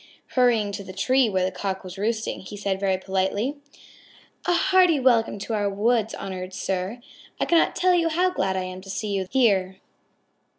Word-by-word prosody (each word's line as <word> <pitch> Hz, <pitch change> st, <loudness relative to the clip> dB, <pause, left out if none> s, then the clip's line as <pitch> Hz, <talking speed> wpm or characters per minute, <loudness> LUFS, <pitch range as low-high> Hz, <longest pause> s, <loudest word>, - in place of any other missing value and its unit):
Hurrying 235 Hz, -5 st, +2 dB
to 200 Hz, -, -6 dB
the 190 Hz, 0 st, -9 dB
tree 255 Hz, +5 st, +2 dB
where 185 Hz, -2 st, +1 dB
the 185 Hz, -, -1 dB
Cock 190 Hz, +1 st, -4 dB
was 185 Hz, -1 st, -8 dB
roosting, 220 Hz, +2 st, -2 dB
he 195 Hz, +2 st, -9 dB
said 195 Hz, -1 st, -2 dB
very 190 Hz, -1 st, +1 dB
politely: 195 Hz, +8 st, -1 dB, 0.9 s
"A 355 Hz, -, +3 dB
hearty 360 Hz, -3 st, +4 dB
welcome 235 Hz, -5 st, +3 dB
to 205 Hz, +3 st, -5 dB
our 205 Hz, -2 st, +1 dB
woods, 220 Hz, +2 st, +1 dB
honored 185 Hz, -1 st, -6 dB
sir. 190 Hz, +5 st, -3 dB, 0.4 s
I -, -, +1 dB
cannot 335 Hz, -1 st, +3 dB
tell 365 Hz, 0 st, +3 dB
you 335 Hz, -2 st, +2 dB
how 360 Hz, +3 st, +2 dB
glad 190 Hz, -, -1 dB
I 185 Hz, -, -1 dB
am 185 Hz, 0 st, -7 dB
to 195 Hz, -, -13 dB
see 210 Hz, +2 st, -3 dB
you 195 Hz, -2 st, -1 dB
here. 195 Hz, -7 st, +2 dB
205 Hz, 185 wpm, -24 LUFS, 190-250 Hz, 0.9 s, hearty